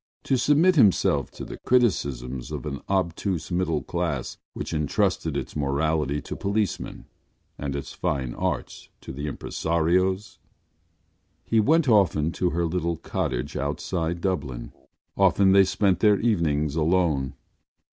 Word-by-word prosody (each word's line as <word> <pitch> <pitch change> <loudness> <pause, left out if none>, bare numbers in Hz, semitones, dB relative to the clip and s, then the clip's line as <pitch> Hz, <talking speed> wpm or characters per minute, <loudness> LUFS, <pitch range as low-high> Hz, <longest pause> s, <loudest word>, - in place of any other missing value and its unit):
To 135 - +1
submit 150 +8 +4
himself 105 -9 +4
to - - -7
the - - -8
criticisms 70 - 0
of - - -5
an 70 -2 -4
obtuse 90 -2 -1
middle 85 -4 0
class 85 -7 -3
which - - -5
entrusted 75 -2 0
its - - -5
morality 75 0 0
to - - -6
policemen 100 0 -2 0.5
and 70 -1 -3
its 70 - -5
fine 65 -4 -2
arts - - -4
to - - -8
impresarios? 85 +7 -1 1.0
He 115 - +2
went 155 +7 +3
often 90 -8 +3
to 90 +1 0
her 85 0 0
little 85 0 -1
cottage - - -3
outside 80 +4 -2
Dublin; 75 -11 -3 0.4
often 95 0 +4
they 95 0 +6
spent 95 -1 +1
their 105 -1 +4
evenings 75 -9 +1
alone. 80 -5 +1
85 Hz, 125 wpm, -25 LUFS, 75-95 Hz, 1.0 s, they